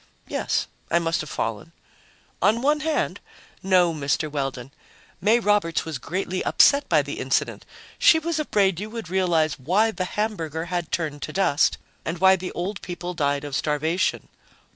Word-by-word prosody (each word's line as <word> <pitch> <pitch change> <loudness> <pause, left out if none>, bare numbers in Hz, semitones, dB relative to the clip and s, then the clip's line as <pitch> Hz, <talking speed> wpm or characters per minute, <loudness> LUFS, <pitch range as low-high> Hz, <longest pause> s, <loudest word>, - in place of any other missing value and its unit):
"Yes. - - -1 0.2
I 170 - +3
must 170 +3 0
have - - -8
fallen." - - -4 0.7
"On 230 +4 +3
one 300 +2 +3
hand? 310 0 -1 0.4
No, 180 -3 +3
Mr. 150 +1 -1
Weldon. 135 -3 -4 0.5
May 220 +5 +4
Roberts 205 -6 +1
was 160 -5 -5
greatly 185 +4 -3
upset 285 0 +4
by - - +4
the - - -6
incident; - - -1 0.3
she 320 - +6
was 320 0 -2
afraid 195 - +1
you 210 +2 -5
would 220 -6 -7
realize 165 -5 +1
why 195 - +2
the 185 -4 -3
hamburger 170 -7 -3
had 175 -3 -2
turned 150 -4 -2
to 155 - -5
dust 165 -6 +2 0.3
and 165 +2 -3
why 190 +2 +6
the 185 0 -5
old 195 +4 -4
people 175 0 -5
died 145 -4 0
of 145 -2 -4
starvation. 155 +5 0
175 Hz, 165 wpm, -24 LUFS, 155-205 Hz, 0.7 s, she